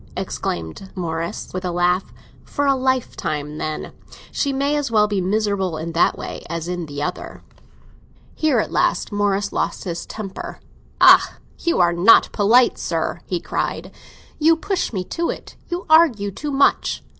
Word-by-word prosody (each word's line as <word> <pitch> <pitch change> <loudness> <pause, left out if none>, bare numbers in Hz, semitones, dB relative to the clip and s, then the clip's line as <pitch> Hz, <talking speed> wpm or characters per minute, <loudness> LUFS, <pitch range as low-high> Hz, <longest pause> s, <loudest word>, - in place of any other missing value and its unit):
exclaimed 85 - -4
Morris, 165 -2 -4
with 185 +1 -4
a 180 - -1
laugh. 175 +1 +1 0.3
"For 285 - -2
a 275 - +4
lifetime, 240 - -2
then! 155 0 -4 0.4
She 280 - 0
may 280 +2 0
as 290 -3 -1
well 210 -2 +3
be 205 -2 -1
miserable 195 -3 0
in 165 +2 -4
that 165 +1 +2
way - - -6
as 170 -1 -4
in 175 -2 -4
the 145 0 -5
other." 180 - -5 0.9
Here 310 -5 +1
at 220 - 0
last - - +1
Morris 205 -1 0
lost - - -2
his 170 -2 -5
temper. 200 -3 -7 0.4
"Ah, - - +7 0.2
you 340 - 0
are 175 -1 +4
not 180 +7 +6
polite, 230 +4 +4
sir!" - - -2
he - - -1
cried. - - -3 0.5
"You 320 +2 +5
push 380 +3 -2
me 190 -5 -2
to 335 - -3
it—you 350 +1 -6
argue 300 -12 +4
too 290 +9 -5
much." 275 0 +2
200 Hz, 155 wpm, -21 LUFS, 175-270 Hz, 0.9 s, Ah